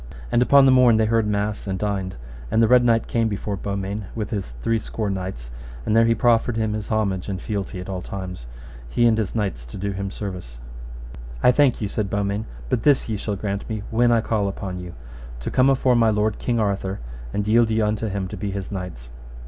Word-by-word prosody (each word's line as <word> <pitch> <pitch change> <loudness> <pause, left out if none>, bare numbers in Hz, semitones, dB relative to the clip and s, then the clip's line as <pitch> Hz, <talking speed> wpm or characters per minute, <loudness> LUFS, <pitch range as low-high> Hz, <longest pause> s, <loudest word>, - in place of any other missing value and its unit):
And 120 - +3
upon 140 +2 +6
the 135 - +6
morn 125 -3 +6
they 110 - +3
heard 110 -1 +2
mass 105 0 -1
and 95 -1 -1
dined, 95 -2 -2 0.3
and - - +2
the 115 - +5
Red 125 +1 +6
Knight 115 -1 +3
came 115 -1 +1
before 100 -1 -3
Beaumains 100 +1 -4
with 110 -3 -4
his 95 - -3
three 115 0 +2
score 110 -1 -3
knights, 90 -11 -5 0.3
and 105 - +1
there 115 0 +6
he 115 0 +3
proffered 115 0 +2
him 110 -1 0
his 105 -1 -4
homage 100 -4 0
and 95 -2 -3
fealty 100 -2 -4
at 90 - -7
all 95 -2 -4
times, 90 -9 -6 0.4
he 120 - +2
and 115 -1 +5
his 110 -2 -2
knights 95 - -2
to - - -9
do 100 +1 -2
him 100 0 -3
service. 90 - -6 0.9
I 125 - +7
thank 135 -2 +3
you, 105 - 0
said 100 0 -2
Beaumains, 100 +1 -1 0.2
but 110 - 0
this 145 0 +3
ye 110 - -1
shall 105 0 -3
grant 100 0 -4
me: 110 -2 -3
when 120 +1 +3
I 115 -1 +4
call 110 -2 0
upon 95 -2 -4
you, 90 -1 -8 0.5
to - - -4
come 130 +1 +4
afore 130 -2 +3
my 115 -1 +4
lord 105 0 0
King 120 -2 0
Arthur, 100 -2 -1 0.3
and 105 +9 -2
yield 115 +1 +4
you 110 -1 +2
unto 105 +1 -1
him 100 -2 -2
to 105 - -6
be 105 +1 -3
his 100 0 -5
knights. 90 -12 -6
105 Hz, 225 wpm, -23 LUFS, 95-115 Hz, 0.9 s, I